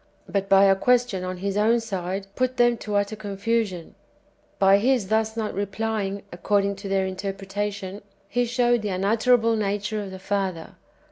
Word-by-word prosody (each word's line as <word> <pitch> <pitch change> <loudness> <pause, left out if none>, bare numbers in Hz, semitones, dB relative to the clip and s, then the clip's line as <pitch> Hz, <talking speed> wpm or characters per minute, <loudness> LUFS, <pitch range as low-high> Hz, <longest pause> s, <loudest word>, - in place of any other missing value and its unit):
"^ - - -36 0.3
but 195 -1 0
by 195 0 +6
a 195 -1 +6
question 245 -3 +2
on 185 0 -4
His 200 -1 -1
own 220 +3 +3
side, 195 -3 -4
put 255 0 0
them 240 0 +4
to 210 -2 -4
utter 205 +1 0
confusion; 205 -3 -2 0.6
by 195 0 +5
His 240 -3 +1
thus 220 +1 +1
not 215 -2 -2
replying, 200 0 -2
according 200 +3 0
to 200 0 -7
their 195 -1 +1
interpretation, 195 +1 -4 0.3
He 245 +4 0
showed 240 0 +2
the 210 - -3
unutterable 225 +4 +2
nature 210 0 -1
of 200 - -6
the 190 - -8
Father. 190 -3 -3
205 Hz, 165 wpm, -24 LUFS, 195-225 Hz, 0.6 s, by